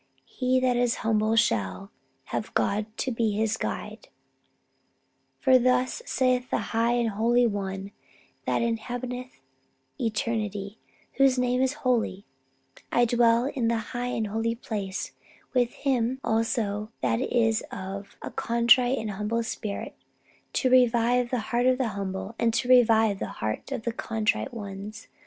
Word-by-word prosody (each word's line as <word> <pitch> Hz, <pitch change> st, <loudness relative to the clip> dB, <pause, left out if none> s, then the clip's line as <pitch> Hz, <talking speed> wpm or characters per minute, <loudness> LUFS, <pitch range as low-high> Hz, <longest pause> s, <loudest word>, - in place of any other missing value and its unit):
He 255 Hz, 0 st, 0 dB
that 255 Hz, -1 st, +2 dB
is 245 Hz, -1 st, +2 dB
humble 215 Hz, -1 st, +2 dB
ever -, -, +1 dB
shall 115 Hz, -, +1 dB, 0.4 s
Have -, -, -3 dB
God 210 Hz, +1 st, +1 dB
to 260 Hz, -, -1 dB
be 225 Hz, -2 st, 0 dB
his 220 Hz, +1 st, +1 dB
guide. -, -, -5 dB, 1.3 s
For 260 Hz, -2 st, +5 dB
thus 250 Hz, -, +1 dB
saith 255 Hz, -1 st, +1 dB
the -, -, +1 dB, 0.2 s
high 230 Hz, +1 st, +2 dB
and 240 Hz, -2 st, +1 dB
holy 235 Hz, +4 st, +3 dB
One 195 Hz, -2 st, -3 dB, 0.6 s
that -, -, +1 dB
inhabiteth 245 Hz, +2 st, -4 dB, 0.6 s
eternity, 215 Hz, -2 st, -2 dB, 0.4 s
whose 270 Hz, -2 st, +4 dB
name 250 Hz, 0 st, +1 dB
is 265 Hz, +2 st, -1 dB
Holy: 225 Hz, -6 st, +1 dB, 0.7 s
I 240 Hz, -, +4 dB
dwell 235 Hz, 0 st, +3 dB
in 265 Hz, -4 st, -1 dB
the 230 Hz, 0 st, +2 dB, 0.2 s
high 245 Hz, 0 st, -2 dB
and 230 Hz, -3 st, -1 dB
holy 225 Hz, +2 st, -1 dB
place, 205 Hz, -5 st, -4 dB, 0.4 s
with 245 Hz, -2 st, +2 dB
him 260 Hz, -2 st, 0 dB
also 220 Hz, -2 st, 0 dB
that 230 Hz, -, +1 dB
is 225 Hz, -4 st, +1 dB
of 195 Hz, +1 st, -7 dB
a -, -, -5 dB
contrite 240 Hz, +2 st, +3 dB
and 215 Hz, -1 st, -3 dB
humble 210 Hz, +4 st, -1 dB
spirit, 215 Hz, -2 st, -5 dB, 0.6 s
to 255 Hz, -, +2 dB
revive 245 Hz, -1 st, +4 dB
the 250 Hz, -, 0 dB
heart 245 Hz, +1 st, +3 dB
of 255 Hz, 0 st, +4 dB
the 255 Hz, -3 st, 0 dB
humble, 195 Hz, +1 st, -4 dB
and 230 Hz, -1 st, +2 dB
to 230 Hz, -, 0 dB
revive 225 Hz, -5 st, +5 dB
the -, -, -3 dB
heart 110 Hz, -, -3 dB
of 255 Hz, -5 st, -3 dB
the 235 Hz, -, -2 dB
contrite 225 Hz, +3 st, -1 dB
ones 210 Hz, -1 st, -7 dB
230 Hz, 145 wpm, -27 LUFS, 215-250 Hz, 1.3 s, For